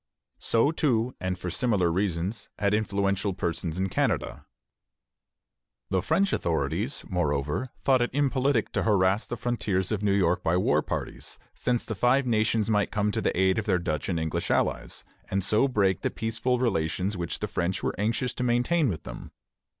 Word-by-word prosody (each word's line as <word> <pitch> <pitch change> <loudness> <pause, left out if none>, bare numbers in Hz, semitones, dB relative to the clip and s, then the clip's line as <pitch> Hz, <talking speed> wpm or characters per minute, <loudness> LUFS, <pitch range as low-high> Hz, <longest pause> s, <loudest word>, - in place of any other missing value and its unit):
So, 115 +6 +2
too, 125 -7 +1
and 90 0 -2
for 90 -1 -4
similar 100 -5 +1
reasons, 95 +2 -2
had 100 0 +1
influential 100 -2 0
persons 85 -1 -3
in 95 +1 0
Canada. 95 - -1 1.4
The - - +2
French 195 0 +1
authorities, 80 -5 -1
moreover, 75 - -1
thought 130 -2 +4
it 120 - +1
impolitic 135 -3 +1
to - - 0
harass 100 -1 +2
the 120 - -4
frontiers 105 -5 -1
of 105 -2 -1
New 105 -1 +2
York 90 -3 +2
by 85 +2 +1
war 90 - +3
parties, - - -5 0.2
since 120 -1 -1
the 110 - -3
Five 125 +6 +3
Nations 110 -2 +2
might 105 -2 +2
come 105 0 0
to 110 - -1
the 95 - 0
aid 95 +3 +3
of 110 - -5
their 95 -3 +3
Dutch 80 -3 -2
and 85 -3 0
English 80 -1 -2
allies, - - 0 0.3
and 95 0 0
so 105 +7 +3
break 100 -7 +1
the - - 0
peaceful 115 +3 -1
relations 100 -4 0
which 85 -2 -3
the - - -3
French 90 +3 -2
were - - 0
anxious 115 +4 0
to 125 - -3
maintain 125 +5 +2
with 85 - -4
them. - - -8
105 Hz, 175 wpm, -27 LUFS, 90-120 Hz, 1.4 s, thought